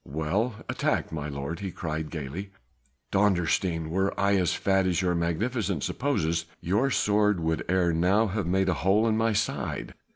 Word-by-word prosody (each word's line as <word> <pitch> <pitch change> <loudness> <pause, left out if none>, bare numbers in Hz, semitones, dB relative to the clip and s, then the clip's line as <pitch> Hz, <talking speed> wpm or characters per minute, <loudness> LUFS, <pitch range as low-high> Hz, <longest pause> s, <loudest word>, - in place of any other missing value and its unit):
"Well 85 - -1
attacked, - - -1
my 75 -2 -4
lord!" 70 +3 -4
he 100 - -4
cried 80 -3 -4
gaily, 80 +5 -5 0.6
"Dondersteen! 90 -4 +1
were 95 +3 0
I 100 0 +3
as 90 -2 +2
fat 95 -1 +2
as 90 -1 +1
your 90 -2 +1
Magnificence 90 - -1
supposes, 85 - 0
your 105 +10 +1
sword 105 -5 +2
would 80 0 -1
ere 90 -2 +2
now 95 +7 +3
have 100 -3 -2
made 95 +1 +2
a - - +3
hole 100 +6 +3
in 110 - +2
my 115 0 +2
side. - - -2
95 Hz, 165 wpm, -27 LUFS, 80-105 Hz, 0.6 s, I